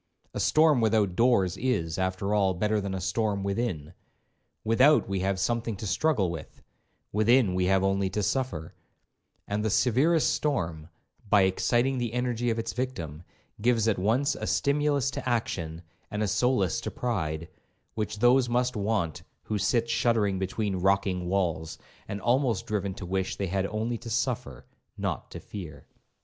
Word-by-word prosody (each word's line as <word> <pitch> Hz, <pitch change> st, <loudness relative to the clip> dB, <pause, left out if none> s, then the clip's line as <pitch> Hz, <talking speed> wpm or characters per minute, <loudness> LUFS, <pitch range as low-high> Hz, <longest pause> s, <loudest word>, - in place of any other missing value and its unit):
A -, -, -4 dB
storm 155 Hz, -5 st, +4 dB
without 110 Hz, -4 st, +2 dB
doors 100 Hz, -6 st, +3 dB
is, 95 Hz, -9 st, -1 dB
after 95 Hz, +2 st, -1 dB
all, 95 Hz, -3 st, +2 dB
better 105 Hz, +3 st, 0 dB
than 100 Hz, -1 st, -3 dB
a -, -, -3 dB
storm 100 Hz, +2 st, -1 dB
within; 100 Hz, -6 st, -2 dB, 0.7 s
without 130 Hz, +7 st, +4 dB
we 95 Hz, 0 st, -1 dB
have 95 Hz, 0 st, 0 dB
something 115 Hz, +2 st, -1 dB
to 105 Hz, -, -7 dB
struggle 100 Hz, -, +1 dB
with, 80 Hz, -3 st, -9 dB, 0.5 s
within 110 Hz, -1 st, +3 dB
we 90 Hz, 0 st, +1 dB
have 95 Hz, +1 st, +3 dB
only 95 Hz, 0 st, +1 dB
to 105 Hz, +2 st, -2 dB
suffer; 110 Hz, -, -2 dB, 0.7 s
and 105 Hz, +1 st, -1 dB
the 110 Hz, -, +1 dB
severest 135 Hz, -, +3 dB
storm, 85 Hz, -, -2 dB, 0.4 s
by 100 Hz, -1 st, +5 dB
exciting 120 Hz, +7 st, +1 dB
the 120 Hz, -2 st, -2 dB
energy 120 Hz, -1 st, -1 dB
of 115 Hz, -, 0 dB
its 115 Hz, 0 st, -3 dB
victim, 85 Hz, -, -4 dB, 0.4 s
gives 115 Hz, -1 st, +2 dB
at 110 Hz, -4 st, +1 dB
once 120 Hz, +9 st, +2 dB
a -, -, -5 dB
stimulus 140 Hz, -1 st, +1 dB
to 125 Hz, -, -4 dB
action, 85 Hz, -8 st, -2 dB, 0.3 s
and 105 Hz, 0 st, -2 dB
a -, -, 0 dB
solace 100 Hz, -2 st, +1 dB
to -, -, -3 dB
pride, 85 Hz, -10 st, -3 dB, 0.5 s
which 110 Hz, -1 st, -3 dB
those 120 Hz, +2 st, +4 dB
must 125 Hz, +1 st, +1 dB
want 100 Hz, -6 st, -1 dB, 0.2 s
who 105 Hz, -1 st, -2 dB
sit 115 Hz, +4 st, +1 dB
shuddering 110 Hz, -5 st, +1 dB
between 95 Hz, +1 st, -2 dB
rocking 95 Hz, -1 st, +1 dB
walls, 85 Hz, -4 st, -1 dB, 0.3 s
and 100 Hz, -, -4 dB
almost 120 Hz, -4 st, +1 dB
driven 100 Hz, -3 st, -2 dB
to 95 Hz, -, -7 dB
wish 95 Hz, +1 st, -2 dB
they 100 Hz, -, -2 dB
had 95 Hz, +1 st, -1 dB
only 110 Hz, +2 st, -2 dB
to 120 Hz, -, -8 dB
suffer, 120 Hz, -, -2 dB, 0.3 s
not -, -, -3 dB
to -, -, -8 dB
fear. 80 Hz, -8 st, -9 dB
105 Hz, 160 wpm, -27 LUFS, 95-120 Hz, 0.7 s, by